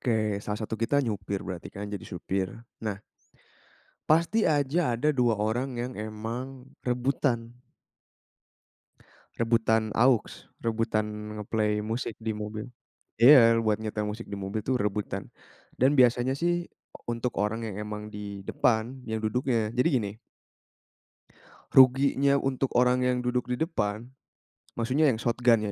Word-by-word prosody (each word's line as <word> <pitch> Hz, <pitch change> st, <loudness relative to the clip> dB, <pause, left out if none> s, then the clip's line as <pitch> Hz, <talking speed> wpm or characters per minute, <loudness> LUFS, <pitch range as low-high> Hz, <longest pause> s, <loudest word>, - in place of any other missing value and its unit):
Oke, 110 Hz, -4 st, 0 dB
salah 105 Hz, +1 st, -4 dB
satu 110 Hz, +1 st, -5 dB
kita 115 Hz, +5 st, +1 dB
nyopir 100 Hz, -3 st, -3 dB
berarti 90 Hz, -2 st, -6 dB
kan, 100 Hz, +1 st, -7 dB
jadi 100 Hz, -, -4 dB
supir. 95 Hz, +1 st, -2 dB, 0.3 s
Nah, 105 Hz, -3 st, -3 dB, 1.1 s
pasti 170 Hz, +8 st, +3 dB
aja 145 Hz, -2 st, +1 dB
ada 150 Hz, +6 st, +2 dB
2 120 Hz, -5 st, +2 dB
orang 120 Hz, +5 st, -1 dB
yang 125 Hz, +2 st, -4 dB
emang 115 Hz, +5 st, -6 dB, 0.2 s
rebutan. 125 Hz, -1 st, -1 dB, 1.9 s
Rebutan 115 Hz, -1 st, +2 dB
aux, 125 Hz, -1 st, +5 dB, 0.4 s
rebutan 115 Hz, -1 st, 0 dB, 0.4 s
nge-play 105 Hz, 0 st, 0 dB
musik 110 Hz, +1 st, -3 dB
di 110 Hz, -1 st, -3 dB
mobil. 105 Hz, +3 st, -5 dB, 0.5 s
Iya, 115 Hz, -3 st, +8 dB
buat 110 Hz, -2 st, +1 dB
nyetel 105 Hz, -1 st, -3 dB
musik 110 Hz, +3 st, -5 dB
di 100 Hz, -, -3 dB
mobil 100 Hz, +2 st, -4 dB
tuh 130 Hz, -3 st, 0 dB
rebutan. 100 Hz, -1 st, -2 dB, 0.5 s
Dan 130 Hz, +3 st, +4 dB
biasanya 125 Hz, +1 st, +4 dB
sih, 175 Hz, +4 st, 0 dB, 0.4 s
untuk 120 Hz, +1 st, -3 dB
orang 105 Hz, +2 st, 0 dB
yang 110 Hz, -4 st, -5 dB
emang 105 Hz, 0 st, -6 dB
di 105 Hz, -1 st, -7 dB
depan 120 Hz, +3 st, 0 dB
yang 110 Hz, -1 st, -3 dB
duduknya 115 Hz, 0 st, 0 dB
jadi 125 Hz, +7 st, +3 dB
gini 100 Hz, -2 st, -4 dB, 1.6 s
ruginya 135 Hz, +1 st, +5 dB
untuk 135 Hz, -1 st, 0 dB
orang 125 Hz, +1 st, +3 dB
yang 125 Hz, 0 st, +2 dB
duduk 125 Hz, 0 st, -1 dB
di 125 Hz, -, -1 dB
depan, 110 Hz, -, -2 dB, 0.7 s
maksudnya 130 Hz, +6 st, +2 dB
yang 120 Hz, -, +2 dB
shotgun 115 Hz, -2 st, +2 dB
115 Hz, 130 wpm, -27 LUFS, 105-125 Hz, 1.9 s, Iya